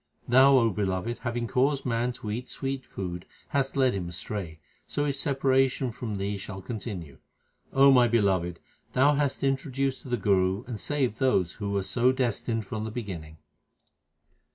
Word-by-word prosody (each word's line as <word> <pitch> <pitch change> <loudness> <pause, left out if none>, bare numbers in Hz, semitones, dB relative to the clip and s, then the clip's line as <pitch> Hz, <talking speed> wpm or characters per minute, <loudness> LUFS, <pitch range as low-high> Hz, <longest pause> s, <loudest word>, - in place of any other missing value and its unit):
Thou, 135 +2 +7
O 115 -3 +4
Beloved, 100 +3 -2
having 120 -1 -2
caused 135 +4 +1
man 120 0 0
to 110 -3 -6
eat 120 +4 -4
sweet 135 -1 -4
food 90 -2 -5 0.3
hast 140 -1 0
led 130 -2 +4
him 90 -3 -3
astray; 85 0 -5 0.3
so 145 - -1
his 140 -1 0
separation 135 -2 +2
from 115 -2 -5
Thee 100 +1 -2
shall 95 0 -7
con 110 +4 -5
tinue. 90 -9 -7 0.5
O 135 +1 +6
my 125 -2 +6
Beloved, 95 -7 +1 0.3
Thou 140 +3 +5
hast 140 -1 0
introduced 135 0 0
to - - -10
the 120 - +1
Guru 95 0 +2
and 115 -4 -6
saved 130 -5 -1
those 95 -10 +2
who 100 -2 -5
were 100 -1 0
so 120 +7 +2
destined 115 -3 -1
from 110 +2 -4
the 110 - -3
beginning. 90 -9 -6
120 Hz, 170 wpm, -27 LUFS, 100-130 Hz, 0.5 s, Thou